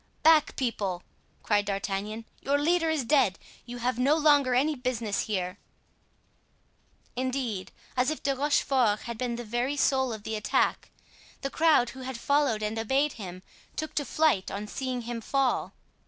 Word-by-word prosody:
"Back, 315 Hz, -2 st, +5 dB
people!" 200 Hz, -8 st, -2 dB, 0.4 s
cried 205 Hz, -1 st, +2 dB
D'Artagnan, 200 Hz, +2 st, -3 dB, 0.2 s
"your 280 Hz, +1 st, +1 dB
leader 330 Hz, +3 st, +2 dB
is 315 Hz, -4 st, 0 dB
dead; 235 Hz, -8 st, +3 dB, 0.3 s
you 245 Hz, 0 st, -6 dB
have 245 Hz, 0 st, -1 dB
no 275 Hz, +4 st, +4 dB
longer 290 Hz, -5 st, +4 dB
any 290 Hz, +5 st, +3 dB
business 245 Hz, -6 st, -2 dB
here." 185 Hz, -2 st, -3 dB, 1.6 s
Indeed, 250 Hz, -6 st, -2 dB, 0.2 s
as 250 Hz, +1 st, +2 dB
if 310 Hz, -, -4 dB
De 275 Hz, -1 st, +1 dB
Rochefort 260 Hz, -6 st, +2 dB
had 235 Hz, -2 st, -6 dB
been 245 Hz, -2 st, -1 dB
the 240 Hz, -, -5 dB
very 240 Hz, +5 st, -1 dB
soul 265 Hz, -2 st, +2 dB
of 220 Hz, -2 st, -6 dB
the 220 Hz, -, -4 dB
attack, 210 Hz, -, 0 dB, 0.5 s
the 275 Hz, -, -3 dB
crowd 310 Hz, -7 st, +4 dB
who 265 Hz, -, -11 dB
had 260 Hz, -1 st, -5 dB
followed 280 Hz, -4 st, +1 dB
and 215 Hz, +1 st, -2 dB
obeyed 270 Hz, +6 st, +1 dB
him 185 Hz, -3 st, -8 dB, 0.3 s
took 310 Hz, -, -4 dB
to 290 Hz, -, 0 dB
flight 300 Hz, -10 st, +2 dB
on 205 Hz, +1 st, -4 dB
seeing 255 Hz, +3 st, -3 dB
him 235 Hz, 0 st, -5 dB
fall. 270 Hz, +2 st, 0 dB
250 Hz, 160 wpm, -28 LUFS, 215-280 Hz, 1.6 s, Back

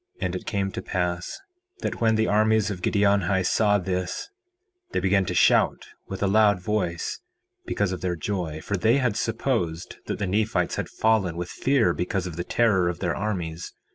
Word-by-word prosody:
4:9 -, -, -2 dB
And 90 Hz, 0 st, -2 dB
it 90 Hz, -, -6 dB
came 100 Hz, -2 st, -1 dB
to -, -, -5 dB
pass 90 Hz, -2 st, -2 dB, 0.4 s
that -, -, -3 dB
when 110 Hz, -1 st, +4 dB
the 110 Hz, 0 st, +2 dB
armies 110 Hz, 0 st, +2 dB
of 90 Hz, -3 st, -6 dB
Giddianhi 100 Hz, -2 st, +2 dB
saw 105 Hz, +2 st, +3 dB
this 90 Hz, -, -3 dB, 0.6 s
they -, -, +1 dB
began 95 Hz, 0 st, +2 dB
to -, -, -3 dB
shout -, -, +3 dB, 0.2 s
with 95 Hz, +1 st, -4 dB
a -, -, +3 dB
loud 105 Hz, -1 st, +4 dB
voice, 90 Hz, -3 st, -2 dB, 0.5 s
because 100 Hz, -2 st, 0 dB
of 90 Hz, -, -4 dB
their 90 Hz, -1 st, -1 dB
joy, 85 Hz, -3 st, -3 dB
for 100 Hz, -, -2 dB
they 110 Hz, +7 st, +3 dB
had 125 Hz, -6 st, +1 dB
supposed 115 Hz, -8 st, -2 dB
that -, -, -2 dB
the 105 Hz, -, -2 dB
Nephites 105 Hz, +3 st, 0 dB
had -, -, -3 dB
fallen 105 Hz, -6 st, +1 dB
with 90 Hz, 0 st, -4 dB
fear 135 Hz, -4 st, +2 dB
because 90 Hz, +1 st, -2 dB
of 90 Hz, -3 st, -5 dB
the 85 Hz, -, -3 dB
terror 95 Hz, -5 st, +2 dB
of 85 Hz, -, -3 dB
their 90 Hz, -3 st, -1 dB
armies. 90 Hz, -5 st, -4 dB
95 Hz, 190 wpm, -25 LUFS, 90-110 Hz, 0.6 s, when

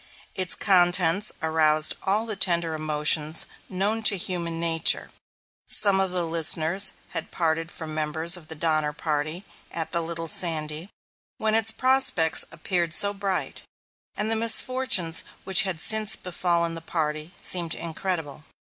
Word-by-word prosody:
Its 185 Hz, -1 st, -2 dB
contents 180 Hz, 0 st, +2 dB
aroused 155 Hz, -1 st, +1 dB
all 205 Hz, +3 st, -1 dB
the 220 Hz, -2 st, -4 dB
tender 170 Hz, -4 st, +1 dB
emotions 155 Hz, 0 st, 0 dB, 0.2 s
known 205 Hz, +4 st, -1 dB
to 210 Hz, -2 st, +4 dB
human 170 Hz, -2 st, -2 dB
nature. 165 Hz, -1 st, +2 dB, 0.6 s
Some 200 Hz, -2 st, +4 dB
of 190 Hz, -1 st, 0 dB
the 180 Hz, -1 st, -2 dB
listeners 165 Hz, +3 st, +3 dB, 0.2 s
had 165 Hz, -2 st, -4 dB
parted 165 Hz, -1 st, -2 dB
from 160 Hz, -3 st, -7 dB
members 160 Hz, +3 st, +1 dB
of 170 Hz, -3 st, -10 dB
the 160 Hz, -, -7 dB
Donner 155 Hz, -1 st, -1 dB
Party 155 Hz, +4 st, -4 dB, 0.3 s
at 165 Hz, -1 st, -5 dB
the 170 Hz, -, -1 dB
Little 165 Hz, 0 st, -6 dB
Sandy, 165 Hz, -3 st, +1 dB, 0.5 s
when 220 Hz, 0 st, -1 dB
its 225 Hz, 0 st, +2 dB
prospects 255 Hz, -10 st, +3 dB
appeared 175 Hz, -3 st, -2 dB
so 200 Hz, 0 st, +6 dB
bright, 195 Hz, -2 st, -4 dB, 0.6 s
and 215 Hz, +1 st, -1 dB
the -, -, +2 dB
misfortunes 225 Hz, -6 st, +2 dB, 0.2 s
which 190 Hz, -1 st, +5 dB
had 190 Hz, -5 st, -3 dB
since 220 Hz, +3 st, +1 dB
befallen 170 Hz, -2 st, -2 dB
the 165 Hz, -, -7 dB
party 155 Hz, -1 st, -4 dB
seemed 170 Hz, -3 st, -1 dB
incredible. 160 Hz, -3 st, -5 dB
170 Hz, 140 wpm, -24 LUFS, 160-195 Hz, 0.6 s, so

